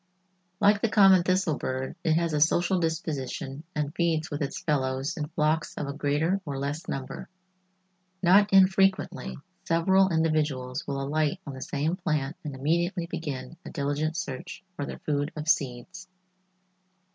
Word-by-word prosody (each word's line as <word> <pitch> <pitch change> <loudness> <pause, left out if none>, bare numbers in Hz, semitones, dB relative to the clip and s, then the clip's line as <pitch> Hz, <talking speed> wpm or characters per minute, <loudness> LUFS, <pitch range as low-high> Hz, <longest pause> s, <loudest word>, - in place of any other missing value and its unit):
Like 205 0 +4
the 230 - +2
common 195 -3 +6
thistle 185 -3 +1
bird, 130 0 -3
it 160 -2 +3
has 165 0 +1
a 150 - +1
social 175 +4 +3
disposition 150 -4 -3
and 150 -1 -2
feeds 165 -2 0
with 145 - -3
its 140 - -2
fellows 135 -2 -1
in 150 -2 -3
flocks 155 0 0
of - - -2
a 140 - -4
greater 150 +7 0
or 140 -5 -4
less 140 +4 -3
number. 135 -1 -5 0.9
Not 200 +4 +5
infrequently 190 - +3 0.3
several 190 +3 +3
individuals 150 -6 0
will 140 -1 -2
alight 150 +4 0
on 140 - -6
the 130 - -8
same 155 +7 -1
plant 150 -5 -1
and 145 -3 -5
immediately 170 +6 0
begin 145 -3 -5
a - - -8
diligent 145 +3 -1
search 135 +7 -6
for 145 -3 -4
their - - -6
food 145 0 -1
of 155 0 -5
seeds. 140 +5 -1
155 Hz, 155 wpm, -27 LUFS, 140-175 Hz, 0.9 s, common